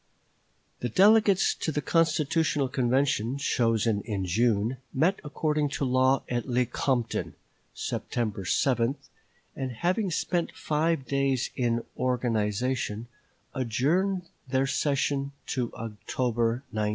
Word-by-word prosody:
" -, -, -42 dB
The 120 Hz, -, -2 dB
delegates 200 Hz, -, +5 dB
to 160 Hz, -, -3 dB
the 150 Hz, -, -1 dB
constitutional 160 Hz, -2 st, +1 dB
convention, 130 Hz, -1 st, +1 dB
chosen 115 Hz, -5 st, +1 dB
in 100 Hz, -4 st, -3 dB
June, 110 Hz, +5 st, +1 dB, 0.2 s
met 165 Hz, +9 st, +2 dB
according 150 Hz, 0 st, 0 dB
to 140 Hz, -, 0 dB
law 130 Hz, +1 st, +3 dB
at 120 Hz, 0 st, -2 dB
Lecompton, 125 Hz, -1 st, 0 dB, 0.4 s
September 110 Hz, -4 st, -3 dB
7, 120 Hz, +5 st, +1 dB, 0.6 s
and, 130 Hz, -1 st, -3 dB
having 185 Hz, -, 0 dB
spent 170 Hz, +1 st, -1 dB
five 155 Hz, -2 st, 0 dB
days 135 Hz, -2 st, 0 dB
in 120 Hz, -2 st, 0 dB
organization, 120 Hz, -1 st, -1 dB, 0.4 s
adjourned 155 Hz, -, +1 dB, 0.2 s
their 130 Hz, +1 st, +1 dB
session 140 Hz, 0 st, 0 dB, 0.2 s
to 125 Hz, -4 st, -1 dB
October 115 Hz, +2 st, -1 dB
19. 105 Hz, -1 st, 0 dB
130 Hz, 110 wpm, -27 LUFS, 115-150 Hz, 0.6 s, delegates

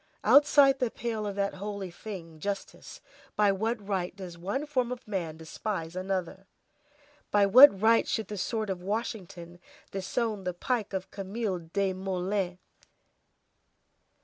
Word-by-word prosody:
Outside 275 Hz, +2 st, +6 dB
the 250 Hz, -, +1 dB
pale 220 Hz, -2 st, -3 dB
of 200 Hz, -, -4 dB
that 200 Hz, 0 st, 0 dB
holy 200 Hz, -1 st, -5 dB
thing, 170 Hz, -4 st, -9 dB
justice, 200 Hz, +4 st, -6 dB, 0.3 s
by 205 Hz, -1 st, +4 dB
what 215 Hz, +1 st, -2 dB
right 185 Hz, -3 st, -2 dB
does 185 Hz, -3 st, -8 dB
one 200 Hz, -, -3 dB
form 255 Hz, -5 st, 0 dB
of 250 Hz, -3 st, -7 dB
man 170 Hz, -6 st, -3 dB
despise 165 Hz, +1 st, -5 dB
another? 190 Hz, 0 st, -3 dB, 0.8 s
By 205 Hz, -1 st, +4 dB
what 235 Hz, 0 st, +9 dB
right 225 Hz, +2 st, +4 dB
should 220 Hz, -, -1 dB
the 210 Hz, -, -5 dB
sword 215 Hz, +1 st, -2 dB
of 180 Hz, -2 st, -4 dB
Washington 185 Hz, -4 st, -5 dB, 0.3 s
disown 205 Hz, +2 st, -2 dB
the 180 Hz, -1 st, -3 dB
pike 220 Hz, +1 st, -2 dB
of 190 Hz, 0 st, -4 dB
Camille 200 Hz, -1 st, -3 dB
Desmoulins? 185 Hz, +1 st, -2 dB
200 Hz, 135 wpm, -29 LUFS, 185-220 Hz, 0.8 s, what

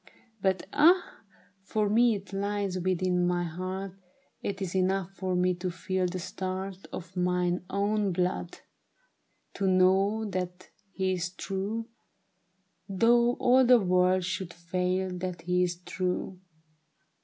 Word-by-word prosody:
But 190 Hz, -1 st, +1 dB
ah, 345 Hz, +5 st, +4 dB, 0.4 s
for 210 Hz, +2 st, 0 dB
me 230 Hz, +2 st, +4 dB
it 200 Hz, 0 st, -9 dB
lies 200 Hz, -1 st, -1 dB
within 180 Hz, 0 st, +1 dB
my 175 Hz, 0 st, +1 dB
heart; 185 Hz, +3 st, -4 dB, 0.5 s
It 200 Hz, -1 st, -3 dB
is 190 Hz, -3 st, -3 dB
enough 190 Hz, 0 st, +1 dB
for 185 Hz, -2 st, -2 dB
me 180 Hz, 0 st, +2 dB
to 180 Hz, +1 st, -3 dB
feel 185 Hz, +1 st, -1 dB
the 180 Hz, +1 st, -4 dB
start 190 Hz, +1 st, -5 dB
Of 180 Hz, +1 st, -8 dB
mine 180 Hz, 0 st, 0 dB
own 200 Hz, +1 st, +1 dB
blood, 175 Hz, -, -2 dB, 0.9 s
to 195 Hz, -, -1 dB
know 190 Hz, +4 st, +3 dB
that 180 Hz, 0 st, -5 dB, 0.2 s
he 190 Hz, -1 st, -1 dB
is 175 Hz, -1 st, -2 dB
true, 200 Hz, +5 st, -4 dB, 1.0 s
Though 235 Hz, +5 st, +4 dB
all 255 Hz, +1 st, +4 dB
the 250 Hz, -1 st, +6 dB
world 185 Hz, -1 st, +3 dB
should 175 Hz, -1 st, -4 dB
fail, 180 Hz, +2 st, -1 dB
that 180 Hz, -2 st, -4 dB
he 180 Hz, +1 st, +1 dB
is 180 Hz, -1 st, +1 dB
true. 185 Hz, 0 st, -3 dB
185 Hz, 130 wpm, -29 LUFS, 180-195 Hz, 1.0 s, the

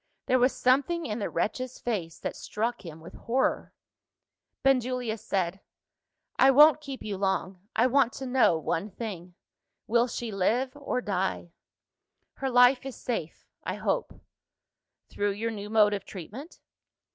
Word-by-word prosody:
There 255 Hz, -, +3 dB
was 250 Hz, +2 st, +4 dB
something 285 Hz, +7 st, +2 dB
in 215 Hz, 0 st, -3 dB
the 205 Hz, -, -2 dB
wretch's 255 Hz, +4 st, -2 dB
face 185 Hz, -9 st, -3 dB
that -, -, -3 dB
struck 230 Hz, +2 st, -3 dB
him 160 Hz, -2 st, -9 dB
with 165 Hz, -, -11 dB
horror. 255 Hz, +3 st, -1 dB, 0.9 s
Benjulia 250 Hz, -3 st, +1 dB
said, 190 Hz, -3 st, -2 dB, 0.8 s
"I 265 Hz, -, +7 dB
won't 300 Hz, +2 st, +7 dB
keep 275 Hz, -3 st, -7 dB
you 205 Hz, -2 st, -4 dB
long; 190 Hz, -1 st, -2 dB
I 230 Hz, -, +4 dB
want 255 Hz, -1 st, +3 dB
to 265 Hz, -, -6 dB
know 250 Hz, -9 st, +3 dB
one 165 Hz, +5 st, -2 dB
thing. 185 Hz, -5 st, -7 dB, 0.5 s
Will 235 Hz, +2 st, +3 dB
she 235 Hz, -1 st, -5 dB
live 235 Hz, +8 st, 0 dB
or 280 Hz, -3 st, -2 dB
die?" 190 Hz, -4 st, -2 dB, 0.8 s
"Her 270 Hz, -, -3 dB
life 250 Hz, +1 st, +5 dB
is 270 Hz, -2 st, -6 dB
safe 195 Hz, -10 st, -5 dB, 0.2 s
I -, -, -3 dB
hope." -, -, -2 dB, 0.9 s
"Through 205 Hz, 0 st, -1 dB
your 225 Hz, +3 st, -3 dB
new 205 Hz, -1 st, -6 dB
mode 210 Hz, -1 st, +4 dB
of 200 Hz, -2 st, -3 dB
treatment?" 215 Hz, -, -10 dB
230 Hz, 145 wpm, -28 LUFS, 195-255 Hz, 0.9 s, I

